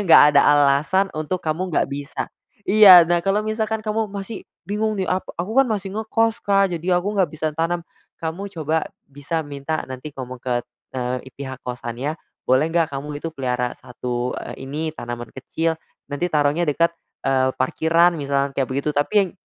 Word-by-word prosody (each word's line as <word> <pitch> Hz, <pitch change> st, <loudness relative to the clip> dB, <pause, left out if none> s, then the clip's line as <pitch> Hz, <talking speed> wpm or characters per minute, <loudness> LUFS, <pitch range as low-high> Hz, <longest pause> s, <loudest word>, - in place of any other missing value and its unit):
nggak -, -, +9 dB
ada -, -, +9 dB
alasan 145 Hz, +7 st, +3 dB
untuk 155 Hz, +4 st, -2 dB
kamu 165 Hz, +4 st, -2 dB
nggak -, -, +2 dB
bisa 140 Hz, +1 st, -5 dB, 0.4 s
iya, 195 Hz, -4 st, +10 dB
nah 175 Hz, 0 st, +1 dB
kalau 195 Hz, +2 st, +2 dB
misalkan 215 Hz, 0 st, -1 dB
kamu 215 Hz, +1 st, -1 dB
masih 200 Hz, +2 st, -6 dB, 0.2 s
bingung 215 Hz, +1 st, 0 dB
nih 190 Hz, -2 st, -2 dB
ap 185 Hz, -, 0 dB, 0.2 s
"Aku 215 Hz, +8 st, -4 dB
kan 270 Hz, -, +7 dB
masih 205 Hz, -4 st, -3 dB
ngekos 225 Hz, +1 st, 0 dB
Kak, 195 Hz, -1 st, +3 dB
jadi 175 Hz, +3 st, -1 dB
aku 205 Hz, +3 st, -3 dB
nggak 190 Hz, -, +4 dB
bisa 155 Hz, 0 st, -2 dB
tanam." 170 Hz, +1 st, 0 dB, 0.4 s
Kamu 165 Hz, +5 st, -4 dB
coba 160 Hz, -1 st, -1 dB, 0.2 s
bisa 145 Hz, +4 st, -3 dB
minta 145 Hz, +1 st, -4 dB
nanti 130 Hz, +3 st, -7 dB
ngomong 130 Hz, -1 st, -7 dB
ke, 120 Hz, 0 st, -1 dB, 0.3 s
eee, 125 Hz, 0 st, -3 dB
pihak 130 Hz, -1 st, -8 dB
kosannya, 125 Hz, +5 st, -4 dB, 0.2 s
boleh 130 Hz, +5 st, +3 dB
nggak 165 Hz, -3 st, +1 dB
kamu 145 Hz, +2 st, -5 dB
itu 165 Hz, +2 st, -5 dB
pelihara 125 Hz, -3 st, -1 dB
1, 125 Hz, 0 st, -4 dB
eee, 135 Hz, -, -7 dB
ini 155 Hz, +2 st, -3 dB
tanaman 120 Hz, -5 st, -7 dB
kecil 160 Hz, +5 st, -2 dB, 0.3 s
nanti 145 Hz, +5 st, -2 dB
taruhnya 150 Hz, +2 st, +1 dB
dekat, 170 Hz, +3 st, +2 dB, 0.3 s
eee, 130 Hz, -1 st, +3 dB
parkiran 165 Hz, +6 st, +3 dB
misal 140 Hz, 0 st, 0 dB
kayak 135 Hz, -2 st, -1 dB
begitu, 140 Hz, +3 st, -1 dB
tapi 185 Hz, +6 st, +2 dB
155 Hz, 170 wpm, -22 LUFS, 135-190 Hz, 0.4 s, iya